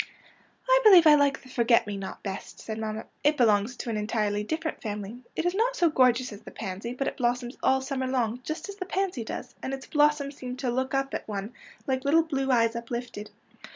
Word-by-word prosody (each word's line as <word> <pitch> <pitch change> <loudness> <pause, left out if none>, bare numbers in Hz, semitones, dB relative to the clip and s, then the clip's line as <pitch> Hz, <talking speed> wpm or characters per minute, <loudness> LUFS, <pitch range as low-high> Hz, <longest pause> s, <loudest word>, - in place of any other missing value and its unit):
'' - - -28
" - - -36
I - - +6
believe 375 -6 +8
I 305 - +9
like 285 -2 +3
the 260 - -15
forget 235 -2 +3
me 205 -1 -4
not 195 -1 -7
best,'^ 195 -1 -6
said 220 0 -6
mamma. 220 0 -4
" - - -40
It 295 +1 +3
belongs 220 -1 +3
to 240 - -6
an 215 - -2
entirely 210 -1 -1
dif 315 +9 -3
ferent 315 - -4
family. 210 +2 -5
It 325 - -1
is 355 - +2
not 470 +5 +1
so 345 -8 +3
gorgeous 255 -3 +3
as 205 - -11
the - - -10
pansy, 210 +4 -5
but 275 +1 -2
it - - -3
blossoms 245 0 -1
all 265 0 +3
summer 265 -1 -2
long, 245 -2 0
just 310 +3 -5
as 400 0 -8
the 370 -3 -5
pansy 380 -11 -1
does, - - -6
and 270 - -3
its 265 - -11
blossoms 295 -1 +2
seem 250 0 -6
to 255 -1 -1
look 260 +2 -1
up 270 0 -1
at - - -4
one 205 +2 -5 0.3
like 260 -1 -1
little 315 +3 +4
blue 270 -4 -2
eyes 230 -2 +3
uplifted. 235 -2 -5
255 Hz, 240 wpm, -27 LUFS, 225-295 Hz, 0.3 s, I